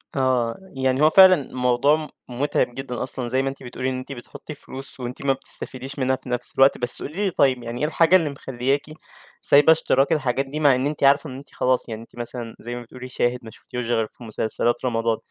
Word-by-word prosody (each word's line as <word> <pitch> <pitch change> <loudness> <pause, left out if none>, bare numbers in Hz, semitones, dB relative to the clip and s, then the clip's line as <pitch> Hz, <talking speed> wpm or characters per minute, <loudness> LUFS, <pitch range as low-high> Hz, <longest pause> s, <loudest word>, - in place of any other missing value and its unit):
آه، 125 -3 +1 0.2
يعني 130 0 0
هو 155 - +7
فعلًا 190 +1 +8
الموضوع 135 +4 +1 0.2
مُتعب 125 -1 -1
جدًا 135 -2 -4
أصلًا، 130 -2 -3
زي 130 +2 +1
ما 135 - -1
أنتِ 135 0 -10
بتقولي 130 +1 -3
إن 130 - -3
أنتِ 130 - -9
بتحطّي 135 +4 -9
فلوس 135 -1 -8
وأنتِ 125 0 -6
ما 135 - +4
بتستفيديش 135 +1 -6
منّها 130 0 +2
في 130 0 -12
نفْس 125 0 -3
الوقت، 135 +1 +5
بس 125 0 0
قولي 190 +8 -3
لي 190 - 0
طيب، 130 -5 +2
يعني 120 +1 -5
إيه - - +2
الحاجة 165 +3 +4
اللي 165 -5 +3
مخلّياكِ 135 0 -2 0.6
سايبة 145 +3 +6
اشتراك 145 -2 +2
الحاجات 135 -3 0
دي 145 +3 -5
مع 145 -4 +5
إن 130 +3 0
أنتِ 150 -1 -4
عارفة 140 +2 +4
إن 130 - -8
أنتِ 140 - -13
خلاص 125 -1 0
يعني 110 -1 -6
أنتِ 115 - -16
مثلًا، 120 -1 -7
زي 120 +1 -6
ما 120 - -6
بتقولي 125 +2 -10
شاهد 125 0 0
ما 110 - -9
شفوفتيهوش 125 +2 -7
غير 115 -2 0
في 120 - -16
مسلسلات 115 +2 -1
رمضان، 115 -2 0
130 Hz, 220 wpm, -23 LUFS, 120-140 Hz, 0.6 s, فعلًا